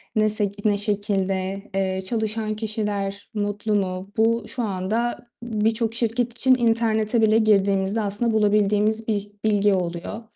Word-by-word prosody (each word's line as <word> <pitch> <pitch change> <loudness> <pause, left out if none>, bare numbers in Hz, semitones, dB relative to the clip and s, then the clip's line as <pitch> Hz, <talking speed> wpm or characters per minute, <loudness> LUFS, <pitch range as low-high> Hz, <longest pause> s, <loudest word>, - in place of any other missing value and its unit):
ne 215 -1 +3
sek 205 -1 -3
ne 205 -1 +3
şekilde? 195 -2 -1
Eee, 190 -1 0
çalışan 215 0 -2
kişiler 210 -2 -3
mutlu 205 0 -1
mu? 190 -1 -2
Bu, 230 +1 +2
şu 250 -2 -3
anda 220 +5 -2 0.2
birçok 225 0 0
şirket 235 +1 0
için 260 +1 +5
internete 225 -1 +1
bile 220 0 +4
girdiğimizde 200 -1 +2
aslında 210 +3 -1
bulabildiğimiz 210 +1 +2
bir 205 -2 -2
bilgi 205 -1 +3
oluyor. 180 +4 -3
210 Hz, 135 wpm, -23 LUFS, 200-225 Hz, 0.2 s, için